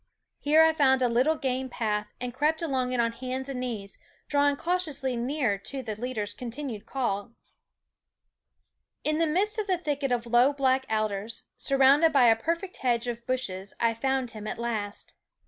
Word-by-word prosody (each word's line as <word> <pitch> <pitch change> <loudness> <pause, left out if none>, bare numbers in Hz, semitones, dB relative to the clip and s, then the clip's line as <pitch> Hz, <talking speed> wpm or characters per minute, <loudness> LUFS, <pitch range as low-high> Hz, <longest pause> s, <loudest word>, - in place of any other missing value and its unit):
There 310 +2 +6
I 320 - +4
found 265 -4 +3
a - - +4
little 250 +7 +2
game 260 -2 -2
path 210 -3 -1
and 245 0 -4
crept 305 +5 +1
along 260 -5 0
it 250 - -1
on 230 0 +2
hands 260 +2 -5
and 265 -2 -4
knees, 220 -6 -5 0.3
drawing 285 0 +3
cautiously 310 -6 -1
near 240 -4 0
to 265 +6 -5
the 220 -3 -4
leader's 215 -3 -4
continued 235 -2 -6
calling. 235 -3 -2 1.7
In 305 +1 0
the 330 - +3
midst 405 +8 0
of 420 -2 -3
a 370 - +3
thicket 290 -5 -2
of 240 -1 0
low 240 +4 +4
black 265 -1 +1
alders, 215 0 -2
surrounded 275 +4 +4
by 270 -4 +5
a 225 - +6
perfect 335 - -3
hedge 240 -2 0
of 235 0 -5
bushes, 200 -7 -3
I 230 -1 +2
found 265 +1 -1
him 215 -1 -8
at - - -4
last. 220 -3 -4
255 Hz, 175 wpm, -27 LUFS, 230-285 Hz, 1.7 s, There